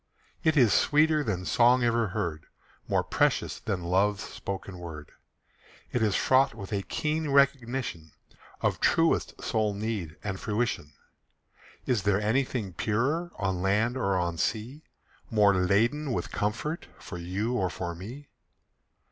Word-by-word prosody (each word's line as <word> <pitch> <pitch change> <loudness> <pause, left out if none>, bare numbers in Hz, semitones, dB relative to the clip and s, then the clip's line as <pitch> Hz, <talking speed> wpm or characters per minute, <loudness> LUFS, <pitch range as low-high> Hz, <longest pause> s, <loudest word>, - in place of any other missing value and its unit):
It 160 -1 +3
is 120 -6 +5
sweeter 155 0 +3
than 90 -7 -2
song 120 +4 +4
ever 115 -1 +2
heard, 85 -4 -3 0.4
More - - +1
precious - - +1
than 100 -6 -3
love's 100 +4 +1
spoken 95 -1 -6
word. 80 -4 -8 0.8
It 120 - 0
is 105 -3 +2
fraught 135 +1 +3
with 100 +1 -7
a 100 - 0
keen 155 - -2
recognition 130 - +1 0.5
Of - - 0
truest - - +2
soul 110 -2 0
need 100 -7 -4
and 95 -2 -3
fruition. 105 - -2 0.9
Is 125 -5 +1
there 100 0 +2
anything 110 -2 0
purer 140 - 0
On 95 -3 -1
land 105 +6 +2
or 100 -7 +1
on 85 -2 -1
sea, 120 - -2 0.5
More 105 -4 +4
laden 115 +11 +2
with - - -3
comfort 130 +11 -2
For 90 -5 -8
you 95 +7 -2
or 95 -7 +1
for 85 0 -4
me? 120 +12 -9
105 Hz, 140 wpm, -28 LUFS, 95-125 Hz, 0.9 s, is